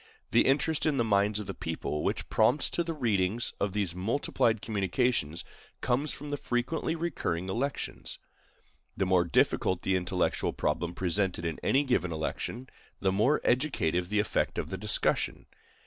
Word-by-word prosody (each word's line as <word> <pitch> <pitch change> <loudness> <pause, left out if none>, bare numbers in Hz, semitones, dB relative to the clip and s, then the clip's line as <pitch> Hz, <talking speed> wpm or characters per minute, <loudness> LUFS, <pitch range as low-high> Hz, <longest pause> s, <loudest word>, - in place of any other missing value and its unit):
The - - +4
interest 145 +4 +2
in 150 -3 +1
the 120 - +3
minds 105 -1 +2
of 105 - -5
the 95 - -5
people 80 -3 -3
which - - -1
prompts 125 +6 +3
to 170 - +1
the 165 - -3
reading 105 -6 +1 0.2
of 100 -2 -1
these 100 -5 -1
multiplied 115 +3 0
communications 100 - 0 0.4
comes 130 +4 0
from 145 +1 -7
the 145 - -1
frequently 130 +7 -1
recurring 135 - -2
elections. 135 +8 -3 0.8
The 95 - +1
more 90 -1 +3
difficult 85 +1 +1
the 95 - +2
intellectual 90 0 0
problem 85 +3 -1
presented 90 -1 0
in 80 -2 -3
any 140 +2 +3
given 125 -10 0
election, 100 +10 -4 0.3
the 95 - +1
more 110 +10 +2
educative 90 - +1
the 105 - 0
effect 105 - 0
of - - -3
the - - -2
discussion. 105 +2 0
105 Hz, 160 wpm, -29 LUFS, 90-130 Hz, 0.8 s, The